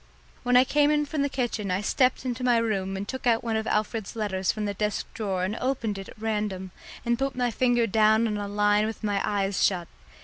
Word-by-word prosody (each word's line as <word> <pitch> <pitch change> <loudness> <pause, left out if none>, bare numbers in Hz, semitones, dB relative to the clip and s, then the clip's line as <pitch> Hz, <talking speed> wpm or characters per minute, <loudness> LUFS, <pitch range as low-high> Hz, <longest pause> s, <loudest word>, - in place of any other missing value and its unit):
When 250 0 +4
I 250 - +7
came 295 +2 +2
from 290 0 -2
the 280 - +1
kitchen 240 -6 -2
I 185 +2 0
stepped 255 +4 +1
into 250 0 -3
my 245 -2 +4
room 195 -4 -1
and 200 +1 -5
took 260 +1 -4
out 230 -1 +3
one 230 -2 -1
of 220 0 -1
Alfred's 215 0 -1
letters 190 -4 0
from 215 -1 -4
the 205 - -2
desk 210 +1 -2
drawer 195 -4 -2
and 200 +4 -1
opened 230 -6 -1
it 195 - -8
at - - -14
random, 210 -4 -2 0.3
and 235 0 +1
put 270 -1 -1
my 245 -1 0
finger 240 0 +2
down 220 +1 +4
on 215 -2 -1
a 205 0 -3
line 205 +1 +2
with 225 0 -6
my 205 -2 0
eyes 200 -2 0
shut. 175 -3 +1
215 Hz, 230 wpm, -26 LUFS, 205-245 Hz, 0.3 s, I